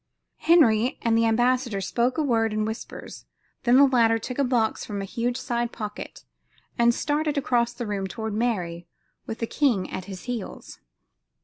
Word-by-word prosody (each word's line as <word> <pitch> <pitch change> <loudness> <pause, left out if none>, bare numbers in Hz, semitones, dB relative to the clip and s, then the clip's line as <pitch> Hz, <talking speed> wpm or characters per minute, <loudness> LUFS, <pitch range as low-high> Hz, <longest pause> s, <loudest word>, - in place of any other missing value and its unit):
Henry 255 -8 +4
and 230 -1 +2
the 230 0 +3
ambassador 240 -1 +1
spoke 235 - 0
a 310 - +2
word 225 -5 +1
in 215 0 0
whispers, 220 +2 -7 0.4
when 245 +1 +5
the 280 - +8
latter 230 -4 +3
took 250 +4 -6
a - - +4
box 240 -4 +1
from 205 -1 -5
a 195 - -3
huge 240 +5 -2
side 240 -2 -2
pocket 210 -2 -7 0.5
and 235 0 +4
started 295 +3 -1
across 240 -4 +1
the 240 0 -6
room 200 -2 -2
toward 220 +2 -5
Mary 180 -7 -2 0.4
with 225 - -4
the 230 - -2
king 230 -7 +1
at 185 - -5
his 190 -2 -8
heels. 240 -5 -6
235 Hz, 175 wpm, -25 LUFS, 215-250 Hz, 0.5 s, the